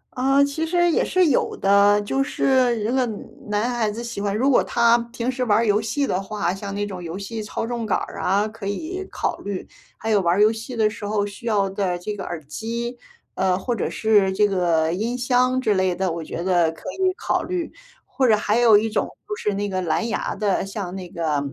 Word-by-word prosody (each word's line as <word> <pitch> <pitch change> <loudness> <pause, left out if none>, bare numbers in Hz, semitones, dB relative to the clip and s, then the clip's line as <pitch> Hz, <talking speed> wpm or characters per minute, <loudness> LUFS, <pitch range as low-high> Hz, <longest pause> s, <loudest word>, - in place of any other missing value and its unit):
呃， 270 +2 +3
其 285 +3 -3
实 345 +1 +3
也 - - +2
是 370 -2 +3
有 280 - +1
的， 200 +1 +4
就 270 +6 0
是 255 -4 +2
一 - - -3
个 255 +4 +1 0.4
男 210 +2 0
孩 235 -3 0
子 225 +3 -5
喜 235 -4 -5
欢 200 0 -1
如 260 - +1
果 255 - +4
他 235 0 +4 0.2
平 240 +1 -2
时 255 0 -2
玩 210 -3 +3
儿 230 - +2
游 210 0 +3
戏 275 +6 -1
的 185 -7 -1
话， 195 -3 -2
像 200 +1 -6
那 205 0 -1
种 190 -3 -7
游 170 +2 -5
戏 220 +3 -5
操 210 +1 -4
纵 235 0 -3
杆 215 - +1
儿 - - -6
啊 200 +3 +2
可 215 -2 -8
以 330 - -4
考 - - -2
虑。 200 -2 -5 0.3
还 220 - -3
有 205 -2 +4
玩 175 -1 +2
儿 205 - +2
游 215 +1 +6
戏 225 +3 -7
的 220 -2 +3
时 215 0 -6
候 205 -1 0
需 205 +4 -8
要 205 -3 +2
的 190 -2 -1
这 205 +4 -5
个 195 - -6
耳 165 -3 -6
机， 230 - -4 0.4
嗯， 185 -1 +1
或 240 +5 -2
者 - - -2
是 205 -3 +3
这 210 +2 +3
个 170 -5 +1
音 230 +6 -2
箱 255 +1 +2
之 220 -5 +2
类 185 -2 +1
的， 185 0 -1
我 165 0 -4
觉 170 +2 -5
得 175 -3 +3
可 165 - -16
以 375 -1 +1
考 - - 0
虑。 360 -2 -3 0.3
或 260 - 0
者 215 -2 +5
还 210 +2 +1
有 230 -3 +7
一 220 +2 0
种 - - 0 0.2
就 420 - -3
是 210 - -2
那 205 +1 -1
个 185 -2 -2
蓝 170 +6 0
牙 225 - -2
的， 205 -3 0
像 195 -2 -5
那 185 -2 -7
个， 160 -4 -1
210 Hz, 255 characters per minute, -23 LUFS, 195-240 Hz, 0.4 s, 有